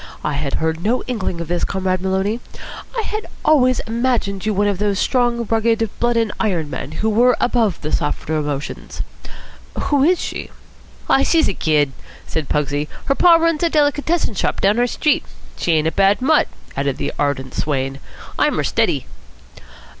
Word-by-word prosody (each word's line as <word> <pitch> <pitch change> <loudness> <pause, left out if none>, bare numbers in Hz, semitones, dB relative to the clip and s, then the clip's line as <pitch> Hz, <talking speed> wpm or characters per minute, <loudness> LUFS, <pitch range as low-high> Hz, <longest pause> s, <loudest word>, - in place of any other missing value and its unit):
"I 150 - -1
had 140 -1 -2
heard 160 +1 -1
no 235 +4 +1
inkling 210 -8 -3
of 170 - -5
this, 175 +1 -1
Comrade 185 -1 -1
Maloney. 190 +4 0 0.6
I 455 - 0
had 430 +1 -4 0.2
always 255 -5 +4
imagined 225 -4 -1
you - - +2
one 205 0 +1
of 200 -2 -1
those 205 -1 +1
strong, 240 0 +1
rugged, 225 0 +2
blood 240 0 +2
and 225 -2 +1
iron 170 -9 0
men 150 - -5
who 215 +8 0
were 245 +3 +4
above 230 -7 +1
the 150 - -4
softer 150 +1 -1
emotions. 145 -2 -4 0.8
Who 285 -2 +2
is 355 +4 +4
she?" - - -5 0.6
"Aw, 270 - +4
she's 320 +3 +3
a - - 0
kid," 150 -5 +1 0.3
said 160 -3 -4
Pugsy. 145 0 0 0.2
"Her 275 - +2
pa 340 +4 +6
runs 330 -2 +2
a 340 - +3
delicatessen 295 -1 +1
shop 195 - -1
down 205 +4 +3
our 245 - +3
street. 300 +4 +1 0.3
She 170 - 0
ain't 155 0 +2
a - - +1
bad 195 +2 +3
mutt," 295 +4 +3 0.3
added 140 -1 -1
the - - -3
ardent 135 -3 -1
swain. 135 -2 -2 0.4
"I'm - - +3
her - - +1
steady." - - +1
205 Hz, 175 wpm, -19 LUFS, 155-250 Hz, 0.8 s, pa